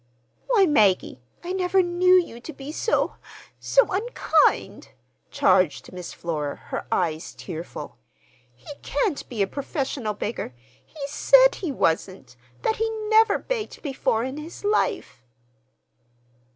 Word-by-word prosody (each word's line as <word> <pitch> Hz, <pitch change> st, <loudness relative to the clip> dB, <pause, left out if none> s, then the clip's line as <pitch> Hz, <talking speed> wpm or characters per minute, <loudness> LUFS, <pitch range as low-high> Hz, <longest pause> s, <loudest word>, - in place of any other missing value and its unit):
"Why, 455 Hz, -6 st, +4 dB
Maggie, 200 Hz, -, +2 dB, 0.2 s
I 355 Hz, +1 st, -4 dB
never 375 Hz, 0 st, +2 dB
knew 360 Hz, +1 st, +4 dB
you 240 Hz, -10 st, -5 dB
to 315 Hz, +6 st, -9 dB
be 275 Hz, +1 st, -8 dB
so—so 460 Hz, +4 st, 0 dB
unkind," 420 Hz, +6 st, +1 dB, 0.4 s
charged 185 Hz, -, +2 dB
Miss 180 Hz, -1 st, -7 dB
Flora, 150 Hz, -4 st, -4 dB
her -, -, -7 dB
eyes 165 Hz, -2 st, -1 dB
tearful. 170 Hz, -2 st, -8 dB, 0.6 s
"He 125 Hz, -, -11 dB
can't 400 Hz, -, -2 dB
be 220 Hz, -5 st, 0 dB
a -, -, +2 dB
professional 265 Hz, -4 st, -3 dB
beggar. 205 Hz, -, -4 dB, 0.3 s
He 290 Hz, -3 st, -8 dB
said -, -, +5 dB
he 345 Hz, -6 st, -4 dB
wasn't—that 130 Hz, -, -2 dB
he 450 Hz, 0 st, 0 dB, 0.2 s
never 440 Hz, 0 st, +5 dB
begged 470 Hz, -4 st, -5 dB
before 260 Hz, -6 st, 0 dB
in 260 Hz, +3 st, -4 dB
his 315 Hz, +6 st, -9 dB
life." 415 Hz, -, 0 dB
280 Hz, 120 wpm, -24 LUFS, -, 0.6 s, said